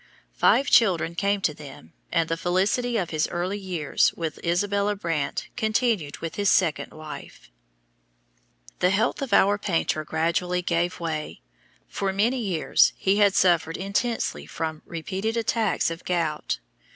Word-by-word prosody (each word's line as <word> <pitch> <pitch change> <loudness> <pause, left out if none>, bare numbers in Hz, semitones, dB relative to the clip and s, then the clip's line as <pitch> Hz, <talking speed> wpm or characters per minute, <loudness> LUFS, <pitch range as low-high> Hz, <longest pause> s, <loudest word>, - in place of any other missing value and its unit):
Five 230 - +3
children 175 -7 +4
came 200 +3 0
to 155 - +1
them 140 - -12 0.2
and 165 - +2
the 165 - -1
felicity 195 +8 0
of 180 -5 -2
his 155 -1 0
early 180 +4 -3
years 180 -6 +1
with 160 -3 -5
Isabella 200 +4 +1
Brandt 165 -7 -3
continued 220 - 0
with 165 - -5
his 200 -1 +2
second 165 -5 +2
wife. 155 - -10 1.3
The 180 - +3
health 200 +8 +1
of 275 - -3
our 205 +2 +4
painter 165 -5 0
gradually 170 +3 -1
gave 175 +1 0
way. 160 -3 -4 0.5
For 195 -1 -2
many 225 +7 +1
years 190 -8 +2
he 195 +1 +1
had 205 -2 +4
suffered 165 -3 +3
intensely 205 +5 -2
from 160 -1 -4
repeated 190 +7 -3
attacks 220 -5 +1
of 165 +1 -7
gout. 165 -4 -1
180 Hz, 140 wpm, -25 LUFS, 165-205 Hz, 1.3 s, children